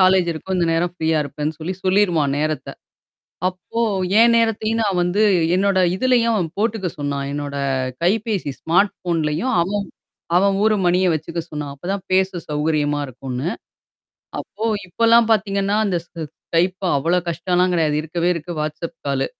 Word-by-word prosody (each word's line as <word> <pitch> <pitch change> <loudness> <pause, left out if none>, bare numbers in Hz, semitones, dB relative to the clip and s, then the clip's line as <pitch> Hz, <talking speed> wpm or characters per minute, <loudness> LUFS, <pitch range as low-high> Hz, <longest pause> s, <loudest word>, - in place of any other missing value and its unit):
College 185 -1 +4
இருக்கும், 185 +4 -4
இந்த 170 - +2
நேரம் 170 +2 0
ஃப்ரீயா 160 -2 +1
இருப்பேன்னு 150 +2 -4
சொல்லி 170 +4 -4
சொல்லிடுவான் 180 -7 +2
நேரத்தை. 155 0 -2 0.8
அப்போ 185 +5 -5 0.4
என் 235 0 +6
நேரத்தையும் 225 0 +1
நான் 195 -4 +1
வந்து 180 +4 +1 0.3
என்னோட 195 0 +2 0.2
இதிலேயும் 235 +1 +2
அவன் 175 -5 -1
போட்டுக்க 215 -3 0
சொன்னான் 140 -1 -2
என்னோட 145 -1 -4 0.5
கைபேசி 205 -4 0
ஸ்மார்ட் 195 +5 +3
ஃபோன்லேயும் 170 +7 -1
அவன் 200 +3 -1 0.5
அவன் 195 +2 +4
ஊர் 220 0 +4
மணியை 180 +1 +3
வச்சுக்க 160 +2 -3
சொன்னான், 150 -2 -4
அப்போதான் 185 +7 -4
பேச 190 0 +3 0.2
சௌகரியமா 150 -1 0
இருக்கும்னு. 130 +2 -5 0.9
அப்போ 215 +3 -8 0.2
இப்போலாம் 230 +4 +4
பார்த்தீங்கன்னா, 200 -1 +1
அந்த 185 -3 0
Skypeபா 175 +3 -2
அவ்வளோ 170 +6 +2
கஷ்டம்லாம் 180 +2 +1
கிடையாது, 155 -3 +1
இருக்கவே 170 +2 -1
இருக்கு 170 0 -6
WhatsApp 155 +2 -4
காலு. 135 -1 0
175 Hz, 140 wpm, -21 LUFS, 155-200 Hz, 0.9 s, என்